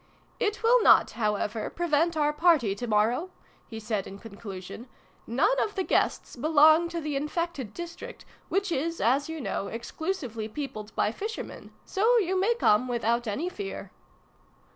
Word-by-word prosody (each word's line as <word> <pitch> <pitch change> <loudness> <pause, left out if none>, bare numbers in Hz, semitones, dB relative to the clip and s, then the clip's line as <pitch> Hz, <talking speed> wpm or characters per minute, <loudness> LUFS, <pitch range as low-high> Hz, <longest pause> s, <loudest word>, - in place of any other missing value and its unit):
"It 425 +1 -1
will 480 +2 +5
not, - - +6
however, 210 -1 -1
prevent 335 0 0
our 295 0 +2
party 300 - +3
to 240 +5 -5
morrow," 225 - +1 0.4
he 225 - -7
said 215 -3 -3
in 195 - -9
conclusion. 200 +1 -9 0.2
" - - -34
None 390 - +2
of 420 - -2
the 380 - 0
guests - - 0
be 270 +5 -3
long 315 +2 +6
to 340 0 -3
the 300 -2 -3
infected 300 - -3
district, 345 +5 -8 0.2
which 390 -1 0
is, 330 +3 -1
as 270 +6 +2
you 320 0 -5
know, 200 -7 -3
exclusively 235 - -4
peopled 220 -4 -6
by 210 - +1
fishermen: 430 - -6
so 450 +5 +3
you 380 -4 +1
may 400 +6 +2
come 250 - +3
without 235 0 0
any 245 +12 -2
fear." 390 +2 -6
295 Hz, 165 wpm, -27 LUFS, 225-345 Hz, 0.4 s, not